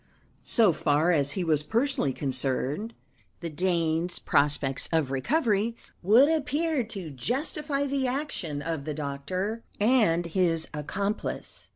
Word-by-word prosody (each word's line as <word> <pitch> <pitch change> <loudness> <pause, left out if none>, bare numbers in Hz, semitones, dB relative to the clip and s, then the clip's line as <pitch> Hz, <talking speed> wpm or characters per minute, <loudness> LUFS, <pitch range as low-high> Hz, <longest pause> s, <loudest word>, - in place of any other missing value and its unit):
So 220 -7 +4
far 150 +3 +2
as 145 -3 +1
he 185 - -2
was 155 -3 +2
personally 235 - +1
concerned, 135 - -1 0.5
the 170 -2 -4
Dane's 170 0 0
prospects 140 -2 +1
of 160 -5 +1
recovery 220 - +1 0.3
would 225 +10 +6
appear 310 -1 0
to 195 -8 -6
justify 280 - -2
the 270 -1 0
action 245 - -3
of 160 -3 -3
the 155 -2 -3
doctor 155 +10 -3 0.2
and 210 -7 +3
his 170 -2 +1
accomplice. 200 +8 -4
180 Hz, 120 wpm, -27 LUFS, 150-235 Hz, 0.5 s, would